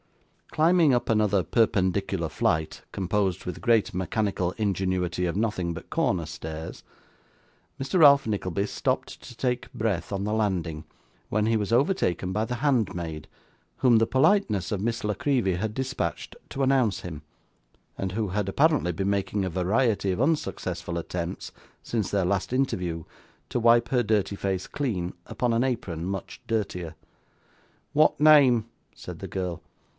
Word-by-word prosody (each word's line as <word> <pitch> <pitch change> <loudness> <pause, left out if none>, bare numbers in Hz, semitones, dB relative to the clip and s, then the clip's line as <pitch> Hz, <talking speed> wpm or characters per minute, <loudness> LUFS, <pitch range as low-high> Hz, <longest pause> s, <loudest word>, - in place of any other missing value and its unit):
Climbing 160 -2 +4
up 120 -1 +1
another 105 -4 +3
perpendicular 95 -2 +1
flight, 80 0 -1
composed 95 -1 -1
with 90 - -5
great 115 -5 +2
mechanical 95 -1 -1
ingenuity 95 -3 -1
of 85 +2 -2
nothing 100 -6 -1
but 80 - -10
corner 85 -3 +1
stairs, 80 0 -7 1.0
Mr. 135 +7 0
Ralph 140 -4 +7
Nickleby 100 -2 -1
stopped - - -2
to 120 - -12
take 125 +1 -2
breath 100 -6 -2
on 100 -1 -2
the 105 - -1
landing, 90 -8 -1 0.5
when 105 0 +1
he 115 +1 +2
was 105 -1 -1
overtaken 115 - +1
by 105 +2 0
the 125 - -3
handmaid, 100 - -1 0.5
whom 120 -3 +5
the 115 - +2
politeness 130 - +2
of 100 - -2
Miss 115 +2 -2
La 105 - +1
Creevy 120 -3 +1
had 105 +4 -2
dispatched 130 - -3
to 135 - -2
announce 130 -6 +2
him, 80 -4 -7 0.8
and 95 -1 -3
who 105 -1 -1
had 100 +1 -1
apparently 145 - +2
been 95 +4 -2
making 100 0 0
a - - -1
variety 100 +3 +1
of 90 - -2
unsuccessful 135 - -1
attempts, 85 +1 -4 0.3
since 110 -5 -2
their 100 -3 +1
last 95 +2 -1
interview, 90 -11 -1 0.5
to - - -1
wipe 120 0 +5
her 125 -3 +2
dirty 105 -2 +1
face 95 -2 -2
clean, 95 -11 -2
upon 120 -2 -1
an 115 +2 +2
apron 110 -11 -2
much 95 +1 -5
dirtier. 90 -7 -2 1.0
'What 155 +1 +4
name?' 140 -7 +6 0.3
said - - -9
the - - -6
girl. 90 -3 -3
105 Hz, 150 wpm, -26 LUFS, 90-120 Hz, 1.0 s, Ralph